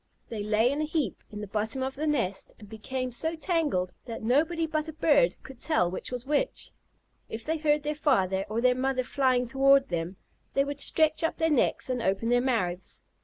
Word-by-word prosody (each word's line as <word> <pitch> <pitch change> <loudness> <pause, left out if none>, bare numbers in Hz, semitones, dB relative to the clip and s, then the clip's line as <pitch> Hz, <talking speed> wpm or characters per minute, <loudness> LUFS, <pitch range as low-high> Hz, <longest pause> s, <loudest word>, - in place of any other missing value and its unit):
They 225 -3 -4
lay 215 +4 +2
in 290 +2 -1
a - - +1
heap 305 -2 -2
in 210 -1 -7
the - - -4
bottom 220 +6 -1
of 265 0 -2
the 305 +3 -3
nest, 230 -11 0
and 210 - -13
became 255 +4 -4
so 320 +7 -1
tangled 310 - 0
that 230 -2 -7
nobody 315 +8 +2
but 310 0 -2
a 315 - -6
bird 285 - +3
could 265 -2 -12
tell 180 - +2
which 185 - -5
was 250 0 -5
which. 300 - -1 0.6
If 220 0 -6
they 320 +1 0
heard 300 -1 +1
their 300 0 -1
father 195 - +1
or 220 +2 -1
their 250 0 +4
mother 255 0 0
flying 255 -1 +1
toward 270 +2 +4
them, 170 +2 -3 0.4
they 275 - +4
would 285 0 -5
stretch 315 +1 +3
up 325 - 0
their 325 -1 +1
necks 285 - +1
and 250 -2 -1
open 195 +2 0
their 245 0 +4
mouths. 190 -9 -2
260 Hz, 210 wpm, -28 LUFS, 220-300 Hz, 0.6 s, their